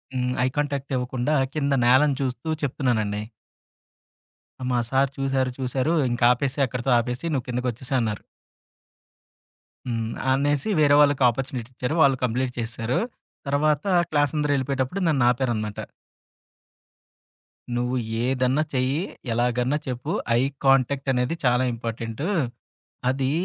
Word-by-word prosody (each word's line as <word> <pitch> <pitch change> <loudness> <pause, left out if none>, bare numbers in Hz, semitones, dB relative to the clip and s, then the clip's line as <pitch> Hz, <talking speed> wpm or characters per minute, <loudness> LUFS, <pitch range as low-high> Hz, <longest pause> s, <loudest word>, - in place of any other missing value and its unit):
హ్మ్. 125 0 0
ఐ - - +3
కాంటాక్టివ్వకుండా 135 -2 -1 0.2
కింద 140 -2 0
నేలను 135 +3 +5
చూస్తూ 130 +1 -3 0.2
చెప్తున్నానండి. 110 -7 0 1.5
మా 125 - +2
సారు 135 +1 +2
చూసారు, 135 -1 0
చూసారు. 130 +4 0 0.2
"ఇంకాపేసేయి. 125 +3 +2
అక్కడితో 125 +1 -2
ఆపేసి 125 +5 -3
నువ్వు 130 -4 -1
కిందకోచ్చేసేయన్నారు." 125 -2 -2 1.7
హ్మ్. 115 -2 -2 0.2
అనేసి 145 +5 +1
వేరే 145 -1 +5
వాళ్ళకి 145 -2 +3
ఆపర్చునిటిచ్చారు. 125 +2 -4
వాళ్ళు 135 -3 +5
కంప్లీట్ 125 +1 0
చేసేసారు. 115 +1 -2 0.5
తర్వాత 145 +2 +1 0.2
క్లాసందరెళ్ళిపోయేటప్పుడు 145 0 0
నన్నాపారన్నమాట. 120 -6 +1 1.9
"నువ్వు 125 +1 0 0.3
ఏదన్నా 130 +3 +1
చెయ్యి, 130 +4 +1 0.3
ఎలాగన్నా 125 +4 +1
చెప్పు. 125 -1 -3 0.3
ఐ - - +3 0.2
కాంటాక్ట్ 135 0 +3
అనేది 125 +5 0
చాలా 125 +1 +3
ఇంపార్టెంటు. 115 +4 -4 0.8
అది 130 0 0
130 Hz, 95 wpm, -24 LUFS, 125-140 Hz, 1.9 s, నేలను